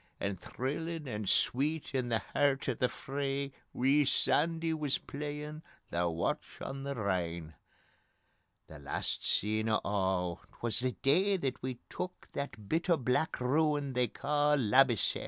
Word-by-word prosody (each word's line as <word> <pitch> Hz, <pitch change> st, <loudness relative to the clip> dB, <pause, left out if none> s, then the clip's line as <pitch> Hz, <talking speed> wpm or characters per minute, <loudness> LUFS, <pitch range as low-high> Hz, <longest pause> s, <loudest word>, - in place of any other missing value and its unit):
And 100 Hz, -3 st, -2 dB
thrillin' 150 Hz, +4 st, -3 dB
and 105 Hz, -4 st, -2 dB
sweet 145 Hz, +5 st, +1 dB
in 130 Hz, -2 st, 0 dB
the 115 Hz, -1 st, +1 dB
hert 140 Hz, -2 st, +2 dB
o' -, -, +2 dB
the 125 Hz, -, +1 dB
fray 140 Hz, 0 st, -3 dB, 0.2 s
Wee 140 Hz, +4 st, +4 dB
Sandy 165 Hz, +4 st, +2 dB
wis 150 Hz, -4 st, 0 dB
playin' 150 Hz, +1 st, -5 dB, 0.3 s
'The 85 Hz, 0 st, +1 dB
Watch 85 Hz, 0 st, -2 dB
on 135 Hz, 0 st, -5 dB
the 140 Hz, 0 st, -3 dB
Rhine'...... 85 Hz, -6 st, -1 dB, 1.1 s
The 80 Hz, -, -11 dB
last 70 Hz, 0 st, -2 dB
scene 110 Hz, +2 st, +1 dB
o' 110 Hz, -, +3 dB
a' 95 Hz, -3 st, 0 dB, 0.2 s
'twas 115 Hz, -2 st, 0 dB
the 130 Hz, 0 st, 0 dB
day 190 Hz, +8 st, +4 dB
that 135 Hz, -7 st, -2 dB
we 130 Hz, -1 st, -3 dB
took 180 Hz, 0 st, -6 dB
That 110 Hz, -8 st, -5 dB
bit 165 Hz, -, 0 dB
o' 170 Hz, -, +5 dB
black 125 Hz, +4 st, 0 dB
ruin 145 Hz, +1 st, +2 dB
they 125 Hz, -1 st, +2 dB
ca' 145 Hz, +5 st, +2 dB
Labbiesell. 125 Hz, -2 st, +4 dB
135 Hz, 150 wpm, -32 LUFS, 110-150 Hz, 1.1 s, o